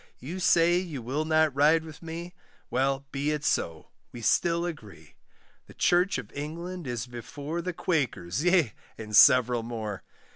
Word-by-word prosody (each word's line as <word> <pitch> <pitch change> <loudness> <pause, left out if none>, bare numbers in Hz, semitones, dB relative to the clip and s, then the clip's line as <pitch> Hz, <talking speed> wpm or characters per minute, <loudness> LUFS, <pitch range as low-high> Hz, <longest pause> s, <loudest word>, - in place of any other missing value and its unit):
You 165 +9 -7
say 175 0 +4
you 170 -7 -5
will 135 +6 -2
not 155 -2 +3
ride 155 +3 +4
with 155 -2 -11
me, 170 +1 -7 0.4
Well, 135 +1 0
be 140 +2 -1
it 150 -1 -2
so, 80 - -1 0.2
we 120 - -9
still 170 +8 +2
agree; 115 - -9 0.5
The - - -15
church 180 0 +2
of 120 -5 -8
England 170 +3 -6
is 120 -2 -3
before 140 +7 -6
The 180 +1 -4
Quakers, 135 - -1
yea, 175 - +3 0.2
and 105 -1 -5
several 125 +1 +6
more. 110 -4 -5
145 Hz, 155 wpm, -27 LUFS, 120-170 Hz, 0.5 s, several